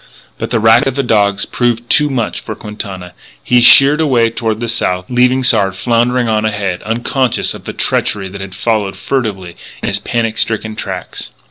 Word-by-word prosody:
But - - -4
the 115 - 0
racket 110 +3 +4
of 135 - -2
the 140 - 0
dogs 100 -4 +1
proved 120 -1 -1
too 150 +4 +3
much 125 -5 -2
for - - -7
Quintana. 95 -4 -8 0.3
He 125 0 +3
sheered 140 +5 +7
away 120 -7 +2
toward 110 -2 -2
the 120 - -3
South, 90 -5 -1
leaving 125 +1 +2
Sard 100 -6 +3
floundering 120 +4 0
on 110 -1 0
ahead, 100 -4 -2
unconscious 120 +3 -1
of - - -12
the - - -6
treachery 95 -2 -1
that 100 +1 -9
had 95 -1 -8
followed 110 -4 -1
furtively 100 -10 -3 0.3
in - - 0
his - - -1
panic 115 -2 -2
stricken 110 -1 -1
tracks. 95 -4 -6
115 Hz, 185 wpm, -14 LUFS, 100-125 Hz, 0.3 s, sheered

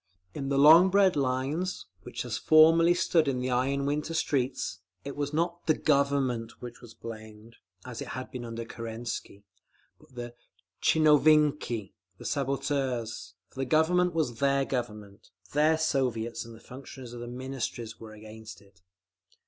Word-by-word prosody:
In 135 -1 -4
the 140 - +1
long 160 +6 +8
bread 195 -1 +4
lines, 140 +7 -1 0.2
which - - -6
as - - -3
formerly 165 +2 +5
stood 170 -3 +2
in 135 -2 0
the 125 0 -2
iron 135 +3 0
winter 150 +3 -2
streets, 130 -10 -1 0.3
it 140 - -6
was 145 -1 -3
not 170 +2 -2
the 155 - +4
Government 140 -5 0
which 120 -1 -9
was 115 -2 -13
blamed, 110 0 -11 0.3
as 125 -2 -7
it - - -6
had 130 +2 -6
been 125 -2 -6
under 115 0 -6
Kerensky, 115 -3 -6 0.6
but 130 - -22
the 120 -1 -6 0.5
tchinovniki, 150 -8 +3 0.2
the - - -12
sabotageurs; 135 - -2
for - - -13
the 135 - 0
Government 170 +5 +2
was 135 -8 -1
their 140 0 +2
Government, 105 -6 -5 0.2
their 155 +2 +3
Soviets—and 120 -6 -2
the - - -14
functionaries 130 0 -11
of 120 - -8
the 120 - -7
Ministries 125 -2 -5
were 110 -1 -10
against 110 +1 -11
it…. 100 -1 -24
130 Hz, 150 wpm, -28 LUFS, 115-150 Hz, 0.6 s, long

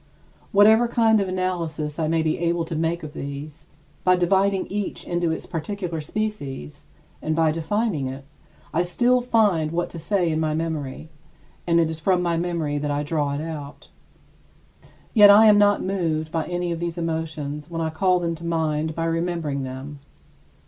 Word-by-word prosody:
Whatever 220 +4 +6
kind 225 -2 +3
of 195 - -1
analysis 170 -5 -2
I 160 - +1
may 165 0 +1
be 155 -1 0
able 170 0 0
to 165 0 -5
make 165 +2 -1
of 150 -1 -7
these, 140 +1 -7 0.4
by 185 0 +5
dividing 190 +2 +2
each 205 0 -4
into 175 -1 0
its 160 - -4
particular 170 0 -4
species, 145 - -5 0.3
and 155 0 -1
by 160 -1 +3
defining 165 - -1
it, 135 +1 -7 0.5
I 165 - +2
still 240 +8 +2
find 210 -10 +2
what 175 +1 -2
to 170 - -7
say 175 0 0
in 155 - 0
my 155 -1 0
memory 160 -2 -4 0.6
and 170 0 +4
it 165 - +3
is 160 - -5
from 180 +2 +2
my 170 -1 +1
memory 165 -4 -1
that 145 0 -2
I 145 0 -1
draw 145 -2 -1
it 145 - -3
out. 150 -3 -7 1.2
Yet 210 -3 +8
I 210 +2 +8
am 210 -1 +7
not 205 0 +4
moved 165 -5 -1
by 165 -2 -2
any 175 -1 -2
of 165 - -3
these 170 0 -3
emotions 155 -3 -4
when 165 -1 -4
I 160 -1 -1
call 180 +2 +2
them 170 -1 -1
to 165 +1 -10
mind 160 -2 -1
by 165 - -1
remembering 165 -4 -1
them. 135 +2 -7
165 Hz, 180 wpm, -23 LUFS, 155-185 Hz, 1.2 s, Yet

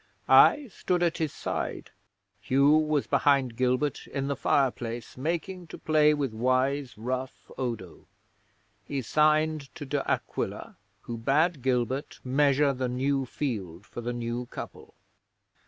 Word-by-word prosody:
I 290 -5 +6
stood 180 -1 0
at 170 0 0
his 160 -3 0
side; - - -4 0.5
Hugh 135 +8 +3
was 155 -2 +3
behind 135 -4 +2
Gilbert 130 +3 0
in 135 0 -3
the 140 - 0
fireplace 120 -4 -1
making 170 +5 -3
to - - -9
play 155 -1 +4
with 140 -6 -2
wise 130 +3 0
rough 130 +3 -5
Odo. 115 -9 -5 0.8
He 135 +2 -4
signed 155 +2 +2
to 145 - -7
De 140 0 -1
Aquila, - - -3 0.3
who 120 - -6
bade 145 +6 +1
Gilbert 130 +1 -1
measure 140 +1 +3
the 130 -1 -2
new 135 +1 0
field 100 - -4
for 120 - -8
the 120 +1 -3
new 120 0 -3
couple. - - -9
135 Hz, 135 wpm, -28 LUFS, 125-150 Hz, 0.8 s, I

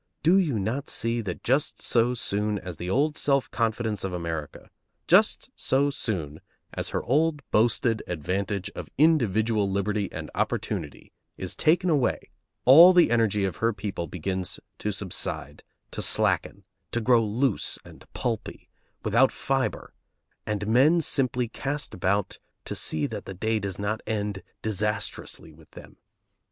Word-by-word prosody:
Do 170 +5 +5
you 150 - 0
not 115 +8 -2
see 115 +1 0
that 95 -5 -6
just 135 +5 +1
so 120 +1 +2
soon 105 -2 -1
as 90 -3 -7
the 90 - -5
old 145 +8 +1
self 140 -2 +1
confidence 110 -2 -1
of 95 -1 -3
America, 85 -3 -5 0.3
just - - +3
so 140 +2 +1
soon 85 - -3 0.3
as - - -3
her - - -2
old 150 +3 +1
boasted 115 0 +2
advantage 95 +4 -3
of - - -8
individual 110 - +3
liberty 100 +1 -1
and - - -7
opportunity, - - -3 0.3
is - - -5
taken 175 +4 +3
away, 140 -5 0 0.3
all 165 +8 +9
the 175 -9 +5
energy 110 -4 +2
of 95 - -3
her 115 0 +1
people 100 -4 -4
begins 95 +2 -3 0.2
to 105 - -2
subside, 95 -7 -3 0.3
to - - -4
slacken, - - +2 0.3
to 120 - 0
grow 120 0 +4
loose 115 +2 0
and - - -15
pulpy, - - -4 0.3
without 115 +5 +4
fibre, 135 -1 -2 0.5
and 105 -1 -2
men 135 +10 +4
simply 125 -5 0
cast 145 +5 -4
about 95 +2 -1 0.3
to - - -4
see 75 -2 +1
that - - -6
the 95 - -7
day 110 +4 0
does 100 -2 -4
not 105 +2 -2
end 105 -2 -2 0.2
disastrously 105 -6 -3
with 75 0 -19
them? - - -14
110 Hz, 145 wpm, -26 LUFS, 95-130 Hz, 0.5 s, all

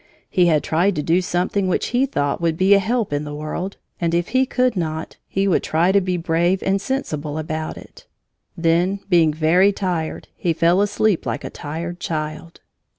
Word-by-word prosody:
He 180 -2 +4
had 155 -3 +3
tried 180 +5 +1
to 150 - -2
do 170 +4 +2
something 185 +2 0
which 185 - 0
he 250 +3 +2
thought 145 - -1
would 165 -1 0
be 190 +3 +5
a 200 - +6
help 220 -2 -1
in 145 +1 -1
the 150 -1 -6
world, 155 +6 -5 0.2
and 170 -1 0
if 175 0 0
he 260 0 +2
could 250 -2 +1
not, 160 -3 -3
he 195 +1 0
would 185 - +2
try 170 +4 +2
to 200 0 +4
be 180 -1 -1
brave 175 +2 +1
and 195 0 +1
sensible 155 - -3
about 155 0 -4
it. - - -14 0.5
Then, 175 +4 +1
being 170 -4 +4
very 165 +6 +3
tired, 180 -5 -3
he 170 - 0
fell 170 +4 +3
asleep 205 -2 +1
like - - -3
a - - -6
tired 170 +4 -6
child. 155 0 -5
175 Hz, 195 wpm, -21 LUFS, 160-195 Hz, 0.5 s, a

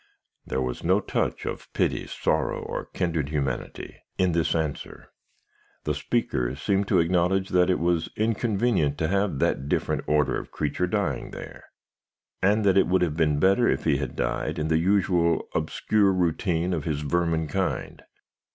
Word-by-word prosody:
"There 65 +1 -1
was 60 -1 -4
no - - +3
touch - - -2
of - - -6
pity, - - 0
sorrow, - - -1
or - - -5
kindred 85 -6 -2
humanity, 70 -4 -3 0.2
in 90 -1 +2
this 85 0 +1
answer. 80 -3 -4 0.7
The 75 - 0
speaker 70 - -1
seemed 95 +7 0
to 95 - +3
acknowledge 90 +3 +2
that 90 0 +3
it 90 - +3
was 85 -1 0
inconvenient 110 - +1
to 80 -1 0
have 100 -5 0
that 70 +1 0
different - - -1
order 75 -2 +2
of - - -10
creature 75 +4 -1
dying 100 0 -1
there, - - -10 0.8
and 105 +2 +3
that 95 -1 +5
it - - +3
would 90 +1 +2
have 80 -4 -1
been 75 -3 +2
better 95 +8 +4
if - - 0
he 70 - +2
had 70 -3 -4
died 60 0 -2
in 80 0 -1
the 80 0 +3
usual 90 -2 +2
obscure 105 -2 +1
routine 90 0 0
of 80 -4 -2
his 75 -2 -2
vermin 80 +1 0
kind. 70 - -2
85 Hz, 165 wpm, -26 LUFS, 75-95 Hz, 0.8 s, that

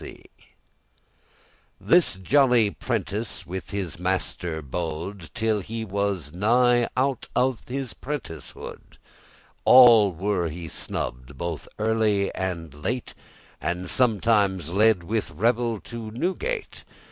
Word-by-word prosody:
*at - - -9
variance - - -11 1.5
This 175 - +3
jolly 120 +2 +3
prentice 110 -1 -3
with 95 +1 -6
his 90 -5 -4
master 90 -3 -2
bode, 80 +4 -5
Till 110 -2 +1
he 110 +4 -5
was 100 -6 -2
nigh 120 +5 +3
out 135 0 0
of 125 -2 +1
his 130 -1 -3
prenticehood, 125 - -8 0.7
All 120 -5 +8
were 90 -1 -1
he 85 +2 -7
snubbed* 65 -3 -5
both 85 0 -4
early 110 -2 +1
and 85 -5 -4
late, 115 +12 -4
*rebuked - - -27 0.4
And 90 +2 -2
sometimes 105 - +2
led 105 -1 +4
with 110 +5 -2
revel 115 +6 0
to 115 -2 -7
Newgate. 190 - -3
105 Hz, 115 wpm, -25 LUFS, 90-120 Hz, 1.5 s, All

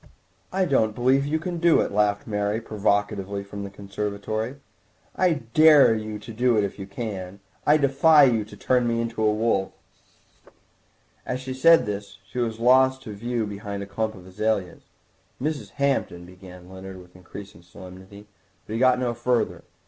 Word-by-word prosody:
"I 190 0 +1
don't 110 -9 +1
believe 130 +3 +2
you 155 +2 0
can 170 +2 -4
do 170 -1 +4
it," - - 0
laughed 105 0 +1
Mary 105 0 -1
provocatively 100 -2 -1
from 100 0 -8
the 100 - -6
conservatory; 105 +4 -4 0.6
"I 165 -8 +1
dare 155 -5 +7
you 110 -1 -4
to 110 +2 -10
do 120 +1 +2
it 105 - +3
if 100 +1 -5
you 95 - -7
can. 100 -3 -6 0.3
I 150 - +6
defy 145 +2 +5
you 115 -5 +3
to 105 - -13
turn 125 -1 +1
me 115 0 0
into 115 -1 -3
a 110 -1 +3
wolf." 105 -3 0 1.5
As 125 - -3
she 130 0 -6
said 165 +5 +5
this 100 -1 -6
she 125 - -6
was 115 -2 -2
lost 130 +2 +4
to 105 - -7
view 115 +2 -2
behind 100 -1 -6
a - - -6
clump 110 +2 -3
of 90 -2 -13
azaleas. 100 -1 -2 0.6
"Mrs. 150 +2 -3
Hampton—" 135 -11 -1
began 90 0 -13
Leonard 95 0 -10
with 90 0 -17
increased 95 +2 -11
solemnity, 95 +3 -13 0.4
but 110 - -7
he 115 - -2
got 130 0 +4
no 125 -1 -1
further. 120 0 -1
110 Hz, 170 wpm, -24 LUFS, 100-125 Hz, 1.5 s, dare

